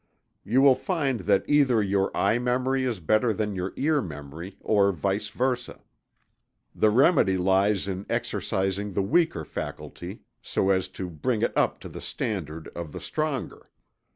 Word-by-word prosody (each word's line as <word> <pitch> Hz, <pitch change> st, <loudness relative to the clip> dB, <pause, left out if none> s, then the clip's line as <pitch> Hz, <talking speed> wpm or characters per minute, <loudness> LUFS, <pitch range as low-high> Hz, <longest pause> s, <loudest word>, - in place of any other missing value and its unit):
_ -, -, -48 dB, 0.5 s
You 130 Hz, +3 st, +5 dB
will 140 Hz, -2 st, +8 dB
find 140 Hz, -, -1 dB
that 100 Hz, 0 st, +1 dB
either 140 Hz, -6 st, +4 dB
your 95 Hz, -1 st, +1 dB
eye 115 Hz, -, +2 dB
memory 130 Hz, +2 st, 0 dB
is 120 Hz, -6 st, -2 dB
better 110 Hz, +8 st, +2 dB
than 105 Hz, 0 st, -2 dB
your 95 Hz, 0 st, -3 dB
ear 150 Hz, 0 st, +2 dB
memory, 80 Hz, +2 st, -8 dB
or 100 Hz, -2 st, +3 dB
vice 95 Hz, +3 st, -2 dB
versa. 125 Hz, -1 st, -2 dB, 0.9 s
The 110 Hz, -, +3 dB
remedy 125 Hz, -, +4 dB
lies 95 Hz, +2 st, +2 dB
in 95 Hz, 0 st, -4 dB
exercising 95 Hz, +1 st, -1 dB
the 100 Hz, -, +1 dB
weaker 100 Hz, -, +1 dB
faculty, -, -, -7 dB, 0.2 s
so 95 Hz, -, 0 dB
as 95 Hz, -1 st, +1 dB
to 95 Hz, -, -3 dB
bring 105 Hz, -, -1 dB
it -, -, 0 dB
up -, -, +1 dB
to -, -, -7 dB
the -, -, -9 dB
standard 80 Hz, -7 st, -4 dB
of 85 Hz, -3 st, -7 dB
the -, -, -5 dB
stronger. 155 Hz, -3 st, -4 dB
100 Hz, 160 wpm, -26 LUFS, 95-130 Hz, 0.9 s, will